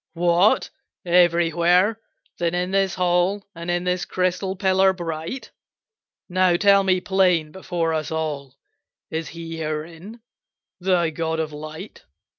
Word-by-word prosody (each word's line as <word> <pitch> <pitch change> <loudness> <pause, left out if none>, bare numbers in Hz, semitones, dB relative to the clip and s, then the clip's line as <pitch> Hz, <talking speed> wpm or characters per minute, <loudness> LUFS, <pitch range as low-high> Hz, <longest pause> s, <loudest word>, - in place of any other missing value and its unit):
"What! 175 +4 +2 0.3
everywhere? 175 +4 +3 0.4
Then 170 0 0
in 180 +1 -1
this 195 -1 +1
hall, 180 +2 +1
And 170 +1 -7
in 175 0 0
this 180 0 -1
crystal 185 +1 -1
pillar 190 0 +3
bright? 170 +6 -6 0.8
Now 185 -1 +2
tell 200 +2 +5
me 185 -1 +2
plain, 180 -5 +2
before 175 -3 -2
us 155 -1 -2
all, 145 -4 -4 0.5
Is 160 -1 -3
He 165 0 -7
herein, 165 +8 -6 0.6
thy 175 -3 +1
God 160 0 -2
of 155 -1 -3
light?" 155 +6 -9
175 Hz, 125 wpm, -22 LUFS, 165-185 Hz, 0.8 s, tell